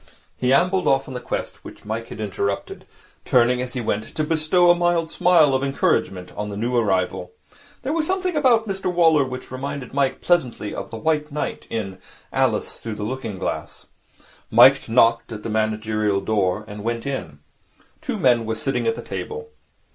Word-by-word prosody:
He 125 0 0
ambled 180 +7 +3
off 135 0 +2
on 130 - -7
the 125 - -4
quest - - -5
which - - -12
Mike 110 +2 -4
had - - -9
interrupted, 100 -1 -3 0.4
turning, 125 0 +3
as 125 0 -3
he 125 - -2
went, 110 -1 -3
to 155 - 0
bestow 165 +3 +3
a - - +4
mild 175 -2 +1
smile 165 -6 +4
of 130 +1 +1
encouragement 95 -9 0
on 105 0 -4
the 100 - -6
new 120 +4 -1
arrival. 95 -5 0 0.5
There 270 +4 -1
was 320 -1 0
something 370 -2 -1
about 245 -6 +3
Mr 190 -2 -2
Waller 165 -4 +4
which 130 -1 -7
reminded 130 0 -5
Mike 140 -1 +1
pleasantly 125 -12 0
of - - -6
the 115 - -7
White 150 +3 0
Knight 150 +1 -4
in 95 -4 -4 0.3
'Alice - - 0
through 115 -2 -5
the 105 - -5
Looking 115 -3 -4
glass.' - - -5 0.6
Mike - - +6
knocked 115 0 +3
at 105 -1 -7
the - - -4
managerial 110 -1 0
door, 100 0 0
and 105 -1 -8
went 115 +2 -2
in. 135 - -4 0.6
Two - - -3
men 120 -3 +3
were 110 - -1
sitting 135 - -1
at 455 - +2
the - - -7
table. 455 0 -6
125 Hz, 185 wpm, -22 LUFS, 110-160 Hz, 0.6 s, Mike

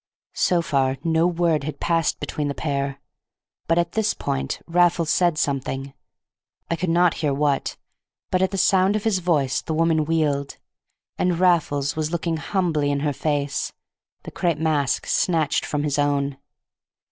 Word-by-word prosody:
So 175 -2 +2
far 135 -4 +1
no 165 +1 +2
word 170 -4 +1
had 155 +2 -5
passed 165 -2 0
between 150 -1 -3
the 140 - -3
pair. 140 -2 -2 0.7
But 165 - +2
at 170 -1 +1
this 220 -1 0
point 65 0 -3
Raffles 170 -2 +2
said 175 -3 +2
something, 135 -1 -2 0.8
I - - +2
could 170 +2 -2
not 175 0 +4
hear 150 -3 +1
what, 145 -1 0 0.5
but 185 - +2
at 190 - +3
the 195 - -4
sound 190 +1 +3
of 215 - -1
his 215 -4 +1
voice 145 -7 +1
the 160 - -3
woman 160 -1 +2
wheeled. 145 -3 0 0.6
And 180 -2 +1
Raffles 155 -6 +2
was 155 -1 -1
looking 170 -1 -1
humbly 155 -2 0
in 140 0 0
her 145 -1 0
face, 145 0 -2 0.5
the - - -8
crape 170 -4 0
mask 150 -4 0
snatched 160 -5 +1
from 145 -1 -1
his 145 -1 0
own. 140 -1 0
155 Hz, 160 wpm, -23 LUFS, 140-170 Hz, 0.8 s, not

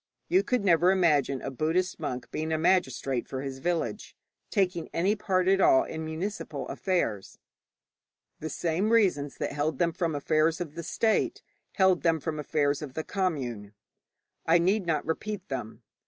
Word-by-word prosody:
You 370 - +5
never 185 -7 +4
could - - +5
imagine 145 -6 +2
a - - -3
Buddhist 170 +7 0
monk 125 -5 -5
being 155 +1 -3
a 160 - +1
magistrate 135 -7 +1
for 130 0 -5
his 135 -1 -5
village, 175 +6 -2 0.3
taking 180 -5 0
any 190 +5 +2
part 185 -3 0
at 195 0 +4
all 335 -1 +6
in 160 0 -5
municipal 165 +6 -4
affairs. 115 - -2 1.0
The 160 - -4
same 175 +7 -1
reasons 180 - +2
that - - -2
held 145 0 -1
them 170 +3 +2
from 165 -3 -1
affairs 155 +3 +1
of 165 -4 -5
the 170 - -5
state 230 - 0 0.3
held 190 -2 +3
them 165 -1 +2
from 155 +1 -4
affairs 145 -1 0
of 140 -4 -7
the 160 - -2
commune. 125 - -3 0.7
I 165 +1 +4
need 185 +2 +1
not 160 -2 0
repeat 195 +4 -3
them. 125 -5 -5
165 Hz, 165 wpm, -28 LUFS, 145-185 Hz, 1.0 s, all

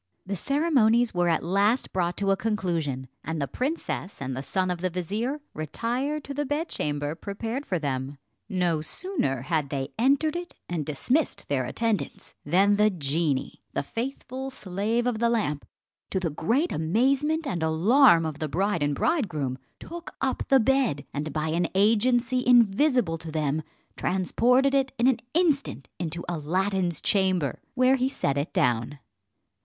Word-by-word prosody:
The 200 +1 -3
ceremonies 245 - +2
were 175 -1 +2
at 165 - +1
last 200 +8 +1
brought 175 -2 0
to 200 -1 +1
a - - +4
conclusion, 170 - -2 0.2
and 160 +1 -3
the 140 - -1
princess 255 - -3
and 130 -1 -4
the 130 - -3
son 185 +6 -1
of 175 -1 -4
the 185 - 0
vizier 210 - -3
retired 245 - -2
to 280 - -6
the 290 +1 -1
bedchamber 150 - -2
prepared 225 - -5
for 185 - 0
them. 140 -2 -3 0.3
No 175 -5 +1
sooner 155 - -2
had 150 -1 -1
they 135 -1 -3
entered 280 +6 +3
it, 350 0 -5
and 165 -5 -3
dismissed 250 - 0
their 135 -3 +1
attendants, 225 - -2
than 195 +7 +3
the 210 +1 +5
genie, 150 -4 -1
the - - -1
faithful 260 - -5
slave 220 0 -2
of 245 -3 0
the 235 0 +3
lamp, 150 -12 -1 0.4
to 190 - 0
the 170 -4 -2
great 235 - 0
amazement 270 - +1
and 180 - -2
alarm 170 - +5
of 155 -2 -4
the 155 - -1
bride 190 +2 0
and 145 0 +1
bridegroom, 155 - 0 0.2
took 340 0 -9
up 265 -1 -1
the 270 - +5
bed, 250 - +1
and 150 +2 -3
by 155 +2 -1
an 170 +2 +1
agency 240 +5 +3
invisible 240 - +4
to 165 - -8
them, 155 -1 0 0.3
transported 250 +9 +2
it 270 -1 +2
in 235 - +2
an 260 -2 +4 0.2
instant 300 - +1
into 170 0 -4
Aladdin's 175 +2 -1
chamber, 185 -8 +1
where 255 +1 +4
he 255 +1 +1
set 140 - -1
it 140 +2 -2
down. 120 +3 +1
195 Hz, 160 wpm, -26 LUFS, 155-255 Hz, 0.4 s, the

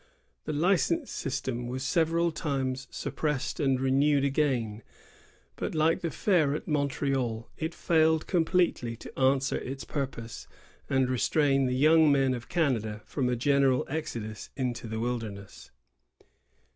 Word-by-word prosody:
The - - -2
license 195 - +1
system 130 -3 -3
was 130 +1 -4
several 170 +2 +2
times 130 -4 -2
suppressed 150 -4 -3
and 135 -2 +2
renewed 140 +2 +3
again; 130 -7 0 0.8
but, - - -3
like 160 +1 +3
the 170 - -1
fair 155 -5 +2
at - - -6
Montreal, 135 -5 -1
it 160 +1 -4
failed 160 -1 +2
com 175 -3 +2
pletely 160 -10 0
to - - -10
answer 135 0 +2
its 135 +1 -6
purpose, 130 -5 -5 0.4
and 135 -2 +2
restrain 135 +2 +2
the 125 - 0
young 155 +2 +5
men 135 -2 +3
of 120 -2 -7
Canada 115 - 0
from 130 -4 -1
a 125 - +1
general 135 0 +2
exodus 115 -8 -5
into 125 -3 -3
the 110 0 -4
wildemess. 110 -4 -5
135 Hz, 135 wpm, -28 LUFS, 125-155 Hz, 0.8 s, young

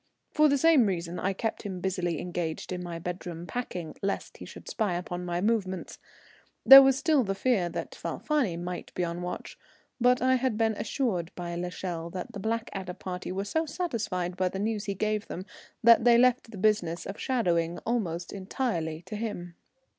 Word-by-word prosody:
For 305 0 +5
the 285 - +3
same 285 -5 +5
reason 175 -2 -3
I 195 - 0
kept 225 +3 -3
him 190 -3 -5
busily 175 -3 -1
engaged 175 -2 -4
in 180 -1 -3
my 175 -1 -5
bedroom 175 0 -5
packing, 180 -8 -5
lest 200 0 -3
he - - -9
should - - -12
spy 210 -6 -1
upon 175 0 -4
my 175 0 -1
movements. 195 -4 -1 0.7
There 270 0 +13
was 270 -1 +4
still 305 -3 +3
the 195 -2 -2
fear 200 -6 +1
that - - -5
Falfani 265 - -1
might 175 +1 -5
be 180 - 0
on 170 0 -2
the - - -5
watch, 180 0 -6 0.4
but 250 +1 +4
I 260 0 +3
had 250 -3 0
been 225 -1 +2
assured 205 - -1
by 175 -1 -5
l'Echelle 175 -1 -4
that 185 +5 -5
the 205 - -6
Blackadder 195 -4 -3
party 180 -1 -5
were 195 +2 -2
so 320 +10 -1
satisfied 215 - -2
by 185 0 +1
the 190 - -5
news 215 +1 -1
he 200 - -2
gave 215 +2 -1
them 185 - -6 0.4
that 230 0 +7
they 240 -1 +6
left 250 -1 +3
the 215 - -9
business 185 -4 +1
of 195 - -6
shadowing 175 -9 0
almost 180 -8 -2
entirely 185 -6 -2
to 215 - -7
him. 205 -6 -4
195 Hz, 190 wpm, -28 LUFS, 175-230 Hz, 0.7 s, There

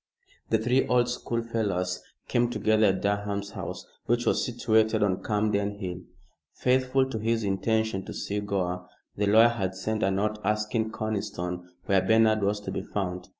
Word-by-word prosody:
The 110 - +4
three 125 +4 +2
old 125 -1 +3
schoolfellows 110 -7 -2 0.3
came 120 0 +2
together 110 -3 +3
at 95 -1 0
Durham's 100 0 -1
house, - - -6 0.2
which 120 +1 +1
was - - +2
situated 110 -3 +2
on 95 -2 +1
Camden 105 -1 0
Hill. 90 -3 -5 0.5
Faithful 130 +1 +2
to 110 - -3
his 115 +1 0
intention 105 0 0
to - - -7
see 100 +1 -2
Gore, 90 -3 -2 0.3
the 105 0 0
lawyer 110 +3 +7
had 95 -5 -2
sent 110 +4 -2
a 95 - +3
note 105 +2 0
asking 105 +2 0
Conniston 100 -5 -4 0.2
where 95 -1 +3
Bernard 110 +2 +4
was 100 +1 +1
to 95 - -5
be - - -2
found. 90 -2 -4
105 Hz, 160 wpm, -27 LUFS, 95-110 Hz, 0.5 s, lawyer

